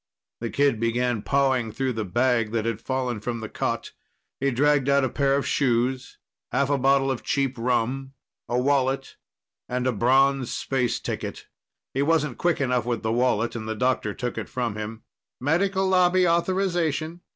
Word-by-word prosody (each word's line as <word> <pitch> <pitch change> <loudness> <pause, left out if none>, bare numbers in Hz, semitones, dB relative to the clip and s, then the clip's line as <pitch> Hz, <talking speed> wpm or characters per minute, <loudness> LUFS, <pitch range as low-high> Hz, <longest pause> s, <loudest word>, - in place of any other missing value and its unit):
The 115 - -3
kid 140 -4 +2
began 120 0 0
pawing 130 -4 +1
through 130 +2 -1
the 110 -1 -2
bag 120 +2 +1
that 115 -1 0
had 115 -1 -2
fallen 130 -3 -2
from 115 +2 -4
the 110 - -5
cot. - - -3 0.5
He 140 - +1
dragged 140 +1 +2
out 140 0 +4
a 130 - +1
pair 140 0 +1
of 140 - 0
shoes, 130 0 0 0.3
half 140 +1 +1
a 140 - +2
bottle 135 +1 +3
of 130 - -3
cheap 135 -2 0
rum, 125 +3 -1 0.4
a 120 - 0
wallet 135 0 0 0.5
and 125 0 -1
a 130 - +3
bronze 130 +3 +3
space 125 -3 -1
ticket. - - -5 0.5
He 135 - 0
wasn't 150 -3 +1
quick 175 -2 +1
enough 125 -4 +1
with 120 -2 -2
the 110 - 0
wallet, 120 -2 +1
and 110 -1 -5
the 110 - -2
doctor 125 -3 0
took 125 -1 -3
it - - -6
from 120 -4 -2
him. 110 +1 -6 0.4
"Medical 190 +7 +1
Lobby 185 -1 +4
authorization. 170 -2 0
130 Hz, 175 wpm, -25 LUFS, 120-140 Hz, 0.5 s, out